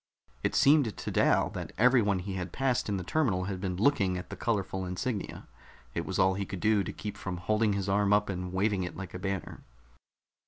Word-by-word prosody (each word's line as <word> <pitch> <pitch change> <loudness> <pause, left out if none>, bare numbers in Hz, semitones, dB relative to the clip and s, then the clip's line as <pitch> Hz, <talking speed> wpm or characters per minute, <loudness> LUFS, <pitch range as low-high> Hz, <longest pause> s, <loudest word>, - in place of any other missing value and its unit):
It - - -1
seemed 140 -6 +4
to - - -4
Dal - - +3
that - - -6
everyone 115 -5 +4
he 95 +2 -5
had 90 -2 -4
passed 130 -2 0
in 100 - 0
the 95 - -4
terminal 105 - +1
had 95 -1 -4
been 95 -2 -2
looking 100 -4 +2
at 90 - -8
the - - -4
colorful 100 -5 -1
insignia; 95 +4 -4 0.5
it - - -3
was - - -2
all 95 0 +4
he 100 +1 -2
could 95 - -5
do 105 -1 +3
to - - -4
keep 105 -1 -6
from 95 -1 -5
holding 105 +4 +1
his 100 -1 -2
arm 100 +1 +2
up 105 0 +4
and 90 -2 -4
waving 100 +1 +1
it 90 - -5
like 95 -1 -7
a 90 - -5
banner. 95 -1 -4
100 Hz, 220 wpm, -30 LUFS, 95-110 Hz, 0.5 s, seemed